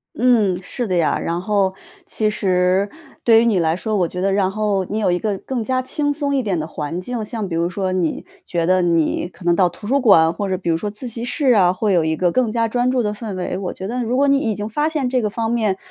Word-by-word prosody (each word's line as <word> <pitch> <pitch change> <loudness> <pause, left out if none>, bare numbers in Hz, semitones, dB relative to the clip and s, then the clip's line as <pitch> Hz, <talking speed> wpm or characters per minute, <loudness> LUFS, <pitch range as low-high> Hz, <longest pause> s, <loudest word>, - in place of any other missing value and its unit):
嗯， 220 -7 +3
是 240 +5 -4
的 185 - 0
呀。 165 - +1
然 170 +1 -2
后 195 -1 +1 0.3
其 215 -1 0
实 185 0 +1 0.3
对 225 -1 +6
于 235 - +2
你 210 -6 +2
来 160 -1 +1
说， 215 +4 -2
我 180 -4 +2
觉 180 - -6
得 195 0 +1
然 195 -2 +2
后 205 -2 0
你 210 - -4
有 200 -4 +1
一 175 - 0
个 205 -3 -2
更 250 +1 -4
加 255 +3 0
轻 290 +2 -1
松 285 -1 -1
一 265 - +2
点 195 -8 -1
的 155 - -3
环 155 +2 -5
境， 230 +3 -4
像 215 -2 -4
比 165 - -4
如 170 +1 0
说， 190 0 -2
你 175 -4 -1 0.2
觉 170 -2 -1
得 185 +1 +3
你 170 -2 +1
可 175 0 -15
能 170 0 +4
到 180 -1 +3
图 205 - -13
书 275 +3 +2
馆， 165 -8 +5
或 200 +2 -3
者 185 - 0
比 175 -2 -4
如 - - +2
说 205 +6 -3
自 210 +5 -5
习 230 0 -5
室 265 +1 +1
啊， 185 -5 +4
会 200 +1 0
有 170 - +3
一 160 0 0
个 175 +1 +1
更 245 0 +1
加 230 0 +1
专 245 +2 0
注 255 -1 +1
的 210 -1 -1
氛 210 -2 -6
围， 180 - -3
我 185 - -3
觉 190 - -6
得 250 +3 -2
如 240 +3 -1
果 280 - +3
你 275 0 +4
已 220 -6 -1
经 210 +1 -4
发 295 +8 0
现 295 -5 -1
这 255 -1 +1
个 210 - 0
方 225 +2 -2
面。 215 -5 0
205 Hz, 300 characters per minute, -20 LUFS, 180-235 Hz, 0.3 s, 对